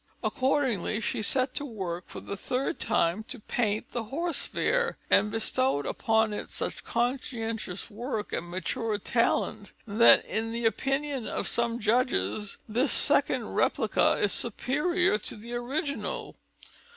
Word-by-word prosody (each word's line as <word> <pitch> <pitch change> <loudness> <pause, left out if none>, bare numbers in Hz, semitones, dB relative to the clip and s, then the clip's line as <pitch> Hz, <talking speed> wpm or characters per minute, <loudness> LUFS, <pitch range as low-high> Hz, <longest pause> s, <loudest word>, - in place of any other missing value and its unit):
Accordingly, 255 -6 0
she 220 - -2
set 255 +4 +1
to - - -3
work 190 -9 -5
for - - -8
the 200 - -5
third 255 +6 -2
time 170 +6 +1
to 255 - -7
paint 215 -1 -2
the 235 -2 -3
Horse 330 +9 -1
Fair, 485 -1 0
and 210 - +5
bestowed 225 - 0
upon 220 -1 +1
it - - -5
such - - -4
conscientious 235 -5 -2
work 220 0 -4
and 175 - -3
mature 210 +4 -2
talent 205 - 0
that 225 +2 +6
in 225 +1 -2
the 235 0 -3
opinion 270 +3 -1
of - - -2
some 235 0 0
judges 220 -2 0
this 245 +6 +1
second - - +5
replica - - +2
is 205 - +1
superior 285 - +1
to - - -5
the 230 +3 -9
original. 275 +5 -3
230 Hz, 140 wpm, -28 LUFS, 210-260 Hz, -, that